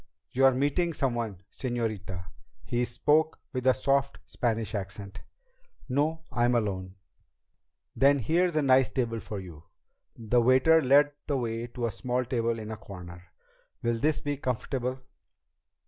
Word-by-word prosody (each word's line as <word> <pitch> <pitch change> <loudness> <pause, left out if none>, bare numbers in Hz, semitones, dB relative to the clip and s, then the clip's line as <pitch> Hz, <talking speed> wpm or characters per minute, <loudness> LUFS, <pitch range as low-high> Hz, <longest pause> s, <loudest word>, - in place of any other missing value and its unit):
"You're 135 0 +4
meeting 145 +6 +1
someone, 120 - -2
señorita?" 110 -8 -3 0.4
He 120 0 0
spoke 155 +5 +2
with 130 -1 -2
a 130 - +6
soft 140 +1 +1
Spanish 115 -3 -2
accent. 100 0 -6 0.7
"No. 150 +5 0
I'm 120 +1 +2
alone." 95 -4 -2 1.0
"Then 140 +1 +5
here's 170 - +1
a 155 - +2
nice 130 -1 +5
table 115 -3 -1
for 105 -2 -6
you." 85 -4 -11 0.5
The 120 +1 +2
waiter 130 +7 +5
led 145 +2 +5 0.2
the 145 - +1
way 115 -1 -3
to 120 0 -4
a 115 - -1
small 125 +3 -2
table 115 -2 0
in 110 0 -6
a 110 - -5
corner. 90 -3 -10 0.6
"Will 115 -1 0
this 150 +4 +1
be 145 -1 -2
comfortable?" 130 0 -2
120 Hz, 140 wpm, -28 LUFS, 110-140 Hz, 1.0 s, a